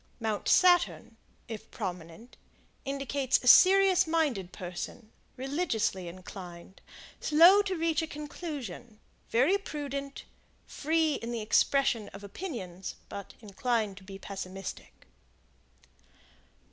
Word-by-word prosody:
Mount 220 -3 -2
Saturn, 355 -1 +4 0.3
if 220 -1 -8
prominent, 180 +2 -7 0.5
indicates 275 -1 0
a - - -4
serious 375 +3 +7
minded 285 - 0
person, 180 +5 -7 0.3
religiously 255 - -1
inclined, 180 0 -10 0.4
slow 340 +6 +7
to 390 -2 -2
reach 325 -1 +1
a 320 - -3
conclusion, 285 - -7 0.3
very 280 +13 +3
prudent, 280 -5 -6 0.4
free 315 +1 0
in 235 - -4
the 235 -2 -3
expression 235 +1 +2
of 195 +1 -10
opinions, 200 - -6
but 200 - -8
inclined 215 0 -1
to 195 - -12
be 195 0 -9
pessimistic. 195 -1 -8
245 Hz, 105 wpm, -29 LUFS, 195-310 Hz, 0.5 s, serious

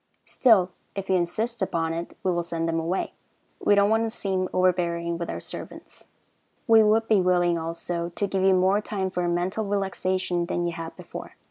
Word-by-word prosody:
Still, 200 -8 +4 0.2
if 195 -1 -3
you - - +4
insist 215 +7 -1
upon 165 -3 0
it, 170 +1 -6
we 185 - +2
will 175 -1 0
send 165 -1 -3
them 165 0 0
away. 170 +4 -2 0.5
We 205 - +5
don't 200 +1 +4
want 225 0 +3
to 225 - 0
seem 190 -4 -2
overbearing 170 -2 +1
with 170 - -4
our - - -3
servants. - - -9 0.6
We 225 -2 +7
would 220 +1 +3
be 210 -3 +4
willing, 175 -2 +2
also, 170 +1 -3
to 205 - 0
give 195 -1 -1
you 190 0 +5
more 190 +3 +3
time 195 -3 -3
for 180 -1 -1
mental 180 +5 -1
relaxation 185 -3 -1
than 175 0 -1
you 170 - -1
had 165 0 -7
before. - - -9
185 Hz, 195 wpm, -25 LUFS, 170-200 Hz, 0.6 s, We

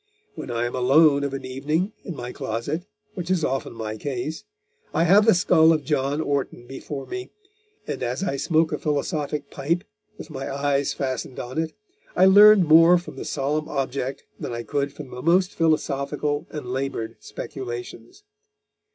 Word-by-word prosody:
When - - -8
I 120 0 -1
am 120 - -3
alone 140 +3 +5
of 140 - -1
an 135 - -6
evening, 150 +10 -1
in 175 - -6
my 125 -2 -6
closet, 140 - -4 0.3
which 180 -1 -5
is 185 -4 +2
often 135 +1 -2
my 110 -1 -5
case, 140 +5 -4 0.5
I 165 - +3
have 200 +6 +5
the 225 - +7
skull 165 -2 +5
of 155 -2 +1
John 140 0 0
Orton 140 -5 -2
before 135 +2 -7
me, 375 0 -6 0.6
and - - -4
as 125 +6 -2
I 175 -8 -1
smoke 160 +2 +2
a - - -2
philosophic 150 -1 -2
pipe, 170 +6 -1 0.3
with 155 - -10
my 135 -2 -5
eyes 140 0 0
fastened 130 -1 -4
on 130 +5 -4
it, 160 -1 -4 0.4
I 185 - +6
learn 205 +1 +8
more 165 +2 +7
from 175 - -8
the - - -7
solemn 150 +2 -2
object 135 -1 -3 0.2
than - - -4
I 120 0 -4
could 140 0 -1
from 140 -2 -10
the 125 - -7
most 180 +4 +3
philosophical 150 -1 0
and 150 -4 -6
laboured 135 -4 -3
speculations. 120 - -8
145 Hz, 170 wpm, -24 LUFS, 135-165 Hz, 0.6 s, learn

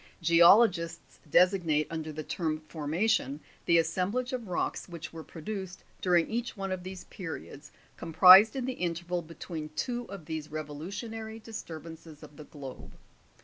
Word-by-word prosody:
9. - - -23
Geologists 170 0 +4
designate 170 -4 +3
under 160 -1 -4
the 155 +1 -6
term 155 -1 -2
formation, 155 - 0 0.3
the 170 - +5
assem 165 +3 +1
blage 255 +2 -2
of 240 -4 -4
rocks 180 +1 -2
which 170 -1 -8
were 165 -1 -8
produced 190 +3 -7 0.2
during 175 -3 +3
each 235 0 -3
one 195 -1 -3
of 185 -1 -3
these 185 0 -8
periods 155 -5 -8 0.3
comprised 185 +7 +8
in 260 -2 -2
the 260 - -2
interval 175 -2 -2
between 160 -1 -7
two 245 +5 -2
of 195 -7 -9
these 155 -2 -5
revolu 155 0 -6
tionary 220 +2 -6
disturbances 165 -7 -9
of 150 -1 -13
the 150 - -11
globe. 140 -4 -10
170 Hz, 155 wpm, -29 LUFS, 155-195 Hz, 0.3 s, comprised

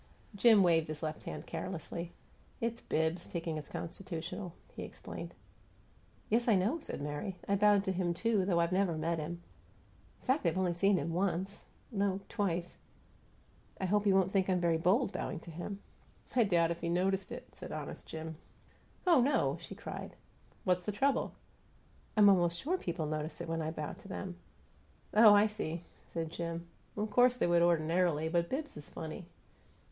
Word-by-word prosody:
Jim 210 0 +6
waved 165 -3 +4
his 155 0 -5
left 155 0 -4
hand - - -5
carelessly. 170 -1 -5 0.5
"It's 230 0 -2
Bibbs, 160 +2 0
taking 165 -2 -3
his 150 - -5
constitutional," 175 +1 -5 0.2
he - - -7
explained. - - -7 0.9
"Yes, 235 +3 +2
I 225 - +6
know," 215 - +1
said 295 - -6
Mary. 150 +6 -4
"I 200 - +3
bowed 205 0 +5
to 190 - 0
him, 180 -2 0
too, 220 0 +2
though 180 -2 +2
I've 170 +1 +2
never 185 -3 +2
met 165 +1 0
him. 170 +3 -5 0.8
In - - -22
fact, 270 +3 +2
I've 165 - +1
only 185 -2 +2
seen 195 +3 +3
him 165 +1 -2
once 190 +2 -1 0.3
no, 200 -3 +1
twice. 180 -5 -2 1.0
I 190 - -1
hope 205 +2 +2
he 200 - +5
won't 190 -1 +3
think 195 -1 +2
I'm 185 -1 +3
very 170 -2 +2
bold, 195 +7 +3
bowing - - -3
to 170 - -10
him." 195 +5 -6 0.5
"I 240 -3 +5
doubt 170 -4 +3
if 170 - -4
he 170 - -1
noticed 190 +2 +1
it," - - -8
said - - -8
honest - - -6
Jim. 160 0 -6 0.7
"Oh, 335 -7 +6
no!" 275 +4 +2
she - - -9
cried. - - -7 0.5
"What's 180 0 +1
the - - +2
trouble?" 270 +6 +1 0.8
"I'm 210 -1 +8
almost 175 -3 +4
sure 330 - 0
people 170 - -2
notice 155 +1 -3
it - - -5
when 165 0 -1
I 155 - -1
bow 155 -2 -4
to - - -13
them." 190 -2 -5 0.8
"Oh, 215 -1 +9
I 205 +1 +6
see!" 175 -6 -3 0.3
said 165 -1 -3
Jim. 170 0 -4 0.3
"Of 210 0 -1
course 245 +3 +5
they - - +2
would 175 0 +4
ordinarily, 165 -1 +2
but 170 0 +1
Bibbs 295 +3 -3
is 150 - -10
funny." 160 +2 -7
180 Hz, 180 wpm, -33 LUFS, 165-205 Hz, 1.0 s, Oh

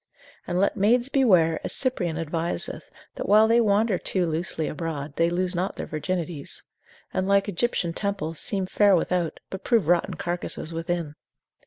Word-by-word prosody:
And 175 +1 0
let 200 - +2
maids 235 +5 +3
beware, 180 - +4
as - - -1
Cyprian 180 - 0
adviseth, 165 +1 -3 0.2
that - - -5
while 215 +2 +6
they 230 +1 +4
wander 210 -2 +2
too 185 -2 +1
loosely 160 -1 -2
abroad, 150 -3 -5
they 165 0 +2
lose 180 +1 0
not 185 +3 -1
their - - -5
virginities: 165 -1 -4 0.5
and 185 0 -1
like 200 0 +3
Egyptian 190 -3 0
temples, 165 -6 -3
seem 195 -2 -1
fair 200 +1 +4
without, 175 -1 -1
but 190 0 -6
prove 225 -9 +2
rotten 175 0 +2
carcases 175 -2 -4
within. 165 -2 -3
180 Hz, 160 wpm, -25 LUFS, 165-200 Hz, 0.5 s, while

